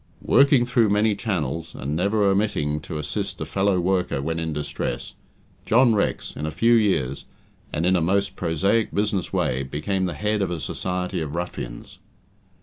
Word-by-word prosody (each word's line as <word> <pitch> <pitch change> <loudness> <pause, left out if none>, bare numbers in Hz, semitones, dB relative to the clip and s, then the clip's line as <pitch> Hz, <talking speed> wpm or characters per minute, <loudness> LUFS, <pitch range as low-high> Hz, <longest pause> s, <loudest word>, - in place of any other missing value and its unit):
Working 135 -2 +5
through 120 -3 +3
many 105 +1 +2
channels, 85 - -3
and 70 +4 -3
never 100 +5 +1
omitting 95 -7 +1
to 75 - -6
assist 75 - -3
a - - -3
fellow 95 -1 +1
worker 90 -4 0
when 80 +4 -2
in 80 -1 -2
distress, 75 -4 -4 0.5
John 120 +1 +4
Rex, 105 - -1
in 75 - -3
a - - -1
few 115 +8 +3
years, 95 - +1 0.5
and 80 - -1
in 95 +1 +4
a 90 - +2
most 100 +4 +1
prosaic 95 +7 +1
business 100 -2 0
way, 65 +1 0
became 75 +8 -2
the 90 - -4
head 105 0 0
of 95 - 0
a 85 -2 -3
society 90 +5 -3
of 75 0 -4
ruffians. - - -6
90 Hz, 170 wpm, -24 LUFS, 75-105 Hz, 0.5 s, Working